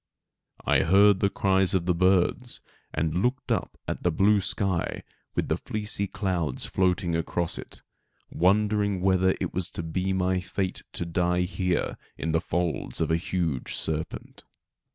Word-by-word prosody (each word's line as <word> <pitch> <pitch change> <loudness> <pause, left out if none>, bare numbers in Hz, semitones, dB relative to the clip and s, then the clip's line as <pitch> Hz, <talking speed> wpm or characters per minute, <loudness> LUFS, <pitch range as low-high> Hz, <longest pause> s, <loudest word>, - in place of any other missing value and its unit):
I - - +4
heard 100 +3 +5
the 100 - +3
cries 95 -1 +2
of 90 -2 +1
the 90 - +2
birds, 95 +7 +2 0.3
and 80 +3 0
looked 125 +4 -1
up - - -1
at - - -3
the 90 - +2
blue 100 +5 +3
sky 95 -2 0 0.3
with - - 0
the - - +1
fleecy 105 -1 -2
clouds 90 -8 -1
floating 90 -2 +1
across 85 0 -1
it, - - -9 0.5
wondering 100 +1 +2
whether 95 0 +3
it - - -3
was 90 -1 -2
to 85 - -5
be 90 +4 -1
my 95 0 +1
fate 95 0 -3
to 85 - -3
die 90 +1 +1
here 90 0 -1 0.2
in 80 - -2
the 80 0 +2
folds 85 -2 -2
of - - 0
a - - +4
huge 85 -5 -2
serpent. 80 0 -4
90 Hz, 155 wpm, -27 LUFS, 85-95 Hz, 0.5 s, heard